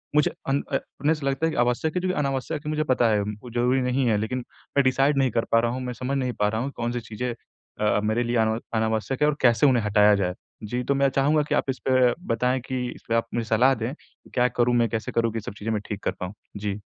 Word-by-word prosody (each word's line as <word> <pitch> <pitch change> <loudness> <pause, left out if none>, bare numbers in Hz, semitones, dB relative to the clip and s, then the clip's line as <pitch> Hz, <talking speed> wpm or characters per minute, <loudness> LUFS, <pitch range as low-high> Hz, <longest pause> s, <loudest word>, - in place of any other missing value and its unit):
मुझे 150 - +4 0.2
अन 140 +1 +2
अ, - - +1 0.3
हमें 150 - +3
ऐसा 155 -3 -1
लगता 135 +4 0
है 165 - +1
कि - - -5
आवश्यक 125 +7 +1
है 180 - +1
जो 185 - -1
कि 185 - 0
अनावश्यक 145 +1 -2
है - - -2
मुझे 155 0 0
पता 125 -5 +2
है, 105 -1 +2
वो 105 +4 -6
ज़रूरी 125 +2 +2
नहीं 125 +1 +1
है 110 -2 +3
लेकिन 120 +4 -2 0.3
मैं 140 - +6
डिसाइड 135 +2 +3
नहीं 130 -3 +2
कर 115 0 0
पा 115 - +5
रहा 115 0 +1
हूँ, 130 +1 -4
मैं 125 -1 -4
समझ 130 +3 -2
नहीं 125 -2 -1
पा 105 - +3
रहा 110 +1 -2
हूँ 140 +3 -3
कौन-सी 120 +1 -2
चीज़ें 115 +3 -4 0.5
अ, 105 0 +2
मेरे 110 +3 +1
लिए 120 0 0
अन 110 +1 0
अनावश्यक 110 +5 -1
है 150 - +5
और 150 - +1
कैसे 120 +2 +4
उन्हें 125 -4 +3
हटाया 105 0 +5
जाए। 90 -2 0 0.3
जी, 120 +4 -2
तो 140 +2 0
मैं 140 0 +3
चाहूँगा 145 +3 +2
कि - - +2
आप - - 0
इसपे 130 -1 +2 0.2
बताएँ 125 +3 +1
कि 130 -1 -2
इसपे 115 - -3
आप 115 0 +1
मुझे 115 -1 -1
सलाह 125 +4 +4
दें 120 +3 -3
कि - - -24
क्या 125 -1 +3
करूँ, 120 0 +1
मैं 120 -1 +3
कैसे 110 0 -3
करूँ 115 -1 +1
कि 115 - -2
सब 100 - -7
चीज़ें 110 +2 -3
मैं 105 - -1
ठीक 105 -1 -5
कर - - +1
पाऊँ? 90 +2 -4 0.2
जी। 105 0 -3
125 Hz, 270 wpm, -25 LUFS, 110-135 Hz, 0.5 s, मैं